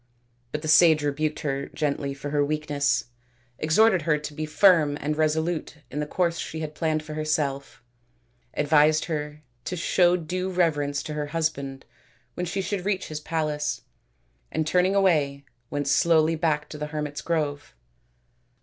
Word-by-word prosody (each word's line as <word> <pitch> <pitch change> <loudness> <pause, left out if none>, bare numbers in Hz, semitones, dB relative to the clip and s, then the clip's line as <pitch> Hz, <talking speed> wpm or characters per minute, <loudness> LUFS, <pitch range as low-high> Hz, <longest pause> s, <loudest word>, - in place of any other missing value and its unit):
But 150 +1 -4
the - - -3
sage 155 0 +6
rebuked 150 +1 -1
her 140 -1 -2
gently 140 -2 -2
for 145 +1 -6
her 145 -1 +2
weakness, 145 -1 0 0.6
exhorted 185 +5 +4
her 155 0 +2
to 150 0 -7
be 155 +1 -4
firm 155 -4 +4
and 150 +1 -2
resolute 160 +1 -1
in 145 - -3
the 150 - -2
course 170 +1 0
she 160 - -5
had 155 -1 -5
planned 155 0 -1
for 155 0 -8
herself; 145 -4 -2 0.7
advised 150 +1 +4
her 150 -2 -4 0.2
to 180 - -3
show 175 +1 +3
due 180 +3 -3
reverence 145 -5 0
to 155 - -5
her 150 -1 -3
husband 145 -4 -3 0.5
when 180 - -3
she 195 +3 -2
should 195 -1 -3
reach 190 -1 -1
his 155 -1 -4
palace; 150 -2 -2 0.7
and 160 - -1
turning 180 +4 +2
away 150 -8 +2 0.2
went 145 -1 -2
slowly 160 +2 +4
back 155 -2 0
to 150 - -8
ths 150 - -2
hermits' 150 -1 -4
grove. 145 - -2
155 Hz, 160 wpm, -25 LUFS, 145-165 Hz, 0.7 s, sage